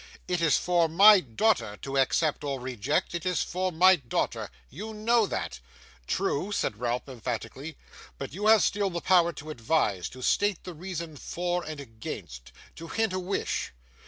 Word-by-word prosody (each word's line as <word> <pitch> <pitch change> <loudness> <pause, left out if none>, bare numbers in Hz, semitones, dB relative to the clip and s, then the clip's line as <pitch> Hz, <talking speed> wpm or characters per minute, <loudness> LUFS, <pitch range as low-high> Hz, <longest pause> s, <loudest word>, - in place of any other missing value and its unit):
'It 180 -1 -1
is 165 -3 +4
for 175 -2 +2
my 200 +5 +8
daughter 115 - 0
to 135 +5 -6
accept 145 +3 +1
or 140 -2 -2
reject; 125 +4 -1
it 170 -2 -3
is 180 -1 0
for 185 +1 -2
my 185 +3 +6
daughter. 125 -7 -2 0.2
You 215 - -8
know 225 0 +2
that.' 70 - -4 0.5
'True,' 180 +9 -1
said 105 - -1
Ralph, 120 +1 -2
emphatically; 130 +4 -6 0.4
'but 135 0 -6
you 205 +5 -1
have 220 -1 +7
still 200 -1 +1
the 170 -2 -4
power 175 -2 +4
to 155 +2 -8
advise; 115 - 0
to 130 0 -10
state 205 +4 +1
the 180 - -7
reasons 170 -3 -6
for 175 0 -2
and 155 -1 -6
against; 110 - -8 0.3
to 165 - -8
hint 220 +1 0
a 185 - -1
wish. 185 +2 -2
165 Hz, 170 wpm, -28 LUFS, 130-185 Hz, 0.5 s, my